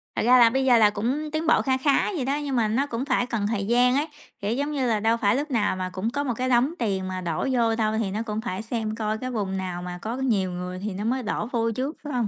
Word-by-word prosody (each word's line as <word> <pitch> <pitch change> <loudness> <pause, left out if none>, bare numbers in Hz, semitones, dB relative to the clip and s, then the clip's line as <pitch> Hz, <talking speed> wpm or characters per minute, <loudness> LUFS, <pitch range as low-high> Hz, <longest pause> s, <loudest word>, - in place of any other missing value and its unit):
Thật - - 0
ra 250 +3 +6
là 235 -1 +7
bây 265 +3 0
giờ 250 -2 +6
là 215 -2 +6
cũng 255 +9 -2
tiến 310 +1 -2
bộ 320 - +5
kha 260 -1 +1
khá 280 +8 +2
vậy 275 -7 -2
đó, 275 +2 0
nhưng 275 -2 -2
mà 230 -3 +2
nó 240 +6 +1
cũng 240 0 -3
phải 245 - +1
cần 225 -4 -2
thời 205 -2 -1
gian 245 +2 +4
ấy. 290 +3 +1 0.3
Kiểu 205 +3 -1
giống 285 +4 -1
như 270 -4 0
là, 220 -3 +1
đâu 225 +2 +2
phải 205 -1 +2
lúc 290 +2 -2
nào 220 -6 +1
mà 185 0 -3
cũng 190 +4 -3
có 285 +4 -2
một 255 -4 -1
cái 255 +3 -2
đống 255 +5 +3
tiền 195 -5 -1
mà 185 0 -4
đổ 170 - -2
vô 230 -3 +2
đâu. 215 -1 0
Thì 205 -4 -1
nó 210 +3 -2
cũng 215 -1 -3
phải 210 -4 -4
xem 220 -1 -3
coi 215 -1 -2
cái 255 +3 -5
vùng 200 -5 -2
nào 180 -2 -4
mà 180 0 -6
có 225 +2 -3
nhiều 215 -9 0
người 180 +1 -5
thì 205 +1 -4
nó 195 +2 -4
mới 250 +3 0
đổ 210 0 -2
vô 230 -2 0
trước, 265 +7 -3
phải 295 -2 -5
hông? 240 -3 0
230 Hz, 305 wpm, -25 LUFS, 205-260 Hz, 0.3 s, là